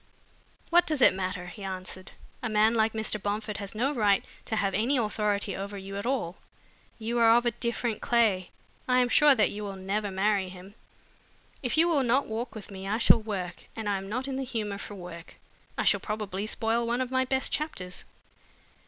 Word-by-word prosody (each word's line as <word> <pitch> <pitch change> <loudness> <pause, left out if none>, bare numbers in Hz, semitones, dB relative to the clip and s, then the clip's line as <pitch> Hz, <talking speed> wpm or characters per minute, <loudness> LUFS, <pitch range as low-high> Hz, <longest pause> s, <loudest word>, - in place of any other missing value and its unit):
"What 350 +1 +5
does 305 -3 0
it - - +7
matter?" 185 -1 -3
he 185 +3 -9
answered. 185 0 -6 0.3
"A 245 - -2
man 215 +1 +4
like 220 -1 +2
Mr. 220 -2 -1
Bomford 210 +1 -2
has 200 +1 -7
no 260 +7 +1
right 205 -6 +3 0.2
to 220 - -2
have 200 -2 0
any 235 +8 +2
authority 210 -3 0
over 200 +1 -5
you 195 0 -7
at 200 +4 -3
all. 225 -10 -1 0.6
You 235 +2 -2
are 230 0 +7
of 240 - +1
a 240 - +3
different 235 -1 -2
clay. 215 -7 +2 0.4
I 250 0 +3
am 250 -1 +3
sure 295 0 +6
that 215 - +3
you 210 - -6
will 200 -1 -5
never 200 +2 -2
marry 195 0 +1
him. 185 +2 -11 0.9
If 250 +3 -1
you 330 +2 +6
will 315 -5 +3
not 260 +2 +2
walk 225 +2 -4
with 210 -1 -9
me, 190 0 -7
I 210 +2 +1
shall 230 0 +6
work, 190 -5 -5
and 225 -2 -4
I 200 -1 +1
am 195 0 -8
not 255 +5 -2
in 265 -1 -3
the 270 - -2
humor 215 -6 -3
for 205 - -7
work. 175 -3 -9 0.4
I - - +1
shall - - +4
probably 210 -2 -3
spoil 230 +2 0
one 240 +1 0
of 255 0 -3
my 260 0 +2
best 265 0 +1
chapters." 185 - -3
215 Hz, 205 wpm, -28 LUFS, 195-240 Hz, 0.9 s, it